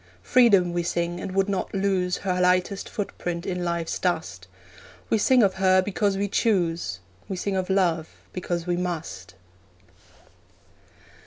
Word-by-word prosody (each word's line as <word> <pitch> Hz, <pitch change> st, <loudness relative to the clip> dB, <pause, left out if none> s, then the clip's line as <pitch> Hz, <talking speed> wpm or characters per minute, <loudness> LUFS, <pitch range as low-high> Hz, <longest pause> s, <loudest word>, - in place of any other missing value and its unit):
Freedom 200 Hz, -8 st, +4 dB
we 175 Hz, -, 0 dB
sing, 170 Hz, 0 st, -2 dB
and 185 Hz, -, -5 dB
would 195 Hz, 0 st, +2 dB
not 195 Hz, 0 st, -2 dB
lose 190 Hz, -2 st, 0 dB
Her 180 Hz, -2 st, -1 dB
lightest 180 Hz, +2 st, +1 dB
footprint 175 Hz, -4 st, -4 dB
in 180 Hz, -1 st, -2 dB
life's 170 Hz, -1 st, -2 dB
dust. 160 Hz, -, -2 dB, 0.6 s
We 220 Hz, -, +3 dB
sing 250 Hz, +3 st, +4 dB
of 195 Hz, -2 st, +3 dB
her 185 Hz, 0 st, +5 dB
because 200 Hz, +1 st, 0 dB
we 200 Hz, +1 st, 0 dB
choose, 170 Hz, -, 0 dB, 0.3 s
We 190 Hz, -, -2 dB
sing 195 Hz, +2 st, -2 dB
of 185 Hz, 0 st, -2 dB
love 175 Hz, -5 st, +1 dB, 0.2 s
because 175 Hz, -2 st, -3 dB
we 175 Hz, -1 st, 0 dB
must. 155 Hz, -, -5 dB
180 Hz, 145 wpm, -25 LUFS, 170-195 Hz, 0.6 s, her